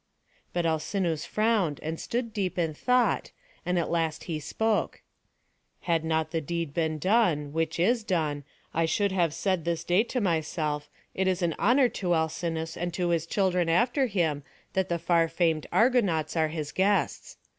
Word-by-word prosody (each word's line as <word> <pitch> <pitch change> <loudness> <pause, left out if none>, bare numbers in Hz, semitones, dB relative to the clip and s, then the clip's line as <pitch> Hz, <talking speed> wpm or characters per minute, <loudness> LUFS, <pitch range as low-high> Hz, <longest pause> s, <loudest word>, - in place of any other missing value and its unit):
'" - - -38
But 175 -1 0
Alcinous 165 0 -1
frowned, 215 -9 +1
and 160 +1 -3
stood 230 -1 -3
deep 190 -4 -2
in 165 -3 0
thought; 250 +9 +1 0.4
and 180 0 +1
at 170 - -1
last 165 -2 -1
he 160 -3 -3
spoke: 215 +8 -1 0.8
"Had 165 -2 0
not 160 -1 0
the 165 - -1
deed 165 -1 -3
been 160 -1 0
done, 165 -6 +2
which 165 0 -1
is 225 +6 +2
done, 155 -7 -1 0.3
I 165 - +2
should 200 +4 +1
have 175 -4 +2
said 170 +2 -1
this 170 0 -1
day 180 +4 +3
to 250 - -2
myself, 155 -5 -1 0.2
'It 190 0 0
is 185 -1 0
an 170 -2 +1
honour 250 +4 +4
to 175 -2 +2
Alcinous, 160 0 -2
and 175 +1 -3
to 180 -1 0
his 165 -1 0
children 180 -3 +1
after 245 - +2
him, 165 -9 0 0.3
that 190 -1 0
the 170 - +1
far 170 0 +2
famed 165 -2 0
Argonauts 205 - +2
are 160 -1 +2
his 155 -2 -4
guests.' 200 +2 0
170 Hz, 175 wpm, -27 LUFS, 160-195 Hz, 0.8 s, honour